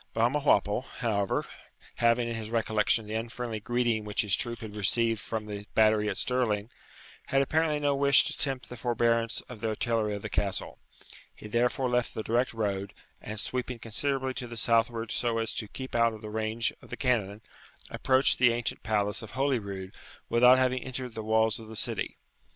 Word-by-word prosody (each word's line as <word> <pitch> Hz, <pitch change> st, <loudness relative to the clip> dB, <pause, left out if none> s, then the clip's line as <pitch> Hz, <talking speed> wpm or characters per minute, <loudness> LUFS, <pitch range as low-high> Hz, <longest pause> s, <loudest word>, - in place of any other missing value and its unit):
Balmawhapple, 115 Hz, -3 st, +2 dB, 0.2 s
however, 100 Hz, -5 st, 0 dB, 0.5 s
having 115 Hz, 0 st, +3 dB
in 120 Hz, -, -3 dB
his 110 Hz, -1 st, -5 dB
recollection 110 Hz, -1 st, +1 dB
the 105 Hz, -, -6 dB
unfriendly 115 Hz, 0 st, -4 dB
greeting 120 Hz, 0 st, 0 dB
which 105 Hz, -1 st, 0 dB
his 105 Hz, -3 st, +2 dB
troop 120 Hz, -1 st, -3 dB
had 105 Hz, -2 st, -8 dB
received 115 Hz, +2 st, +2 dB
from 110 Hz, -2 st, -4 dB
the 105 Hz, -1 st, -7 dB
battery 110 Hz, -1 st, +4 dB
at -, -, -2 dB
Stirling, 115 Hz, -4 st, 0 dB, 0.6 s
had 135 Hz, 0 st, +3 dB
apparently 155 Hz, +1 st, +1 dB
no 145 Hz, -1 st, +2 dB
wish 140 Hz, 0 st, +5 dB
to -, -, -1 dB
tempt 135 Hz, -3 st, -1 dB
the 125 Hz, -, -7 dB
forbearance 115 Hz, -1 st, +1 dB
of 120 Hz, -4 st, -12 dB
the 115 Hz, -, -1 dB
artillery 110 Hz, -1 st, 0 dB
of 100 Hz, -, -7 dB
the -, -, -3 dB
Castle. -, -, -3 dB, 0.6 s
He -, -, -10 dB
therefore 120 Hz, +4 st, +1 dB
left 125 Hz, -1 st, 0 dB
the 110 Hz, -, -3 dB
direct 120 Hz, +3 st, +1 dB
road, 100 Hz, -3 st, -3 dB, 0.3 s
and, 110 Hz, 0 st, -4 dB
sweeping 125 Hz, +1 st, -3 dB
considerably 130 Hz, +4 st, -1 dB
to 125 Hz, -1 st, -5 dB
the 120 Hz, 0 st, -8 dB
southward 115 Hz, 0 st, +1 dB
so 120 Hz, -2 st, 0 dB
as 115 Hz, -1 st, 0 dB
to 110 Hz, -, -3 dB
keep 130 Hz, +5 st, -8 dB
out 115 Hz, -1 st, +3 dB
of 110 Hz, 0 st, -11 dB
the 105 Hz, -, -6 dB
range 110 Hz, +1 st, 0 dB
of -, -, -16 dB
the -, -, -6 dB
cannon, 110 Hz, -5 st, 0 dB, 0.5 s
approached 130 Hz, +1 st, +3 dB
the 125 Hz, -2 st, +6 dB
ancient 120 Hz, 0 st, -2 dB
palace 105 Hz, -2 st, 0 dB
of 110 Hz, -, -10 dB
Holyrood 100 Hz, -8 st, -2 dB, 0.4 s
without 125 Hz, +2 st, +6 dB
having 130 Hz, 0 st, +1 dB
entered 130 Hz, -2 st, -5 dB
the 110 Hz, -, -5 dB
walls 110 Hz, 0 st, +2 dB
of 110 Hz, -, -11 dB
the 110 Hz, -, -9 dB
city. -, -, -2 dB
115 Hz, 185 wpm, -29 LUFS, 110-125 Hz, 0.6 s, the